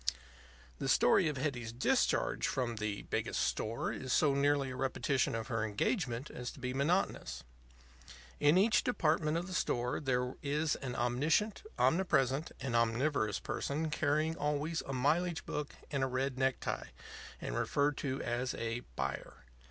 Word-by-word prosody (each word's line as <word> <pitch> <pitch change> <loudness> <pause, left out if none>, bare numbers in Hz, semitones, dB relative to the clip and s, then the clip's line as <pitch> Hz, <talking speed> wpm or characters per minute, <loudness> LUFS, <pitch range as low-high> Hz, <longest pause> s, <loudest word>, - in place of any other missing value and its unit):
The - - -1
story 180 - +5
of 150 -3 -2
Hetty's 130 -5 -2
discharge 120 +2 +1
from 120 -3 -1
the 105 -1 -3
Biggest - - -2
Store 115 +2 -1
is 130 -1 -5
so 145 +1 +4
nearly 140 -1 +2
a - - -5
repetition 135 -1 0
of 115 -1 -3
her 115 -3 0
engagement 120 - -1
as 125 -1 -5
to - - -13
be 125 0 -3
monotonous. 140 - 0 1.0
In 145 +4 +5
each 215 +4 +4
department 160 - +1
of 170 - -2
the 185 - -7
store 125 -8 0
there 125 -2 0
is 150 +1 0
an 125 -2 -5
omniscient, 150 - +1 0.2
omnipresent, 150 -5 +2
and 130 -4 -2
omnivorous 115 - +2
person 155 +2 -2
carrying 155 +2 +1
always 150 +2 -1
a 135 - -3
mileage 160 +6 +1
book 150 -1 -4 0.2
and 140 -2 0
a - - +2
red 130 +1 -1
necktie, 130 0 -1 0.5
and - - -4
referred 145 - +1
to 135 -1 -2
as 120 +2 -1
a 115 +1 -2 0.2
"buyer." - - -4
135 Hz, 150 wpm, -34 LUFS, 125-155 Hz, 1.0 s, story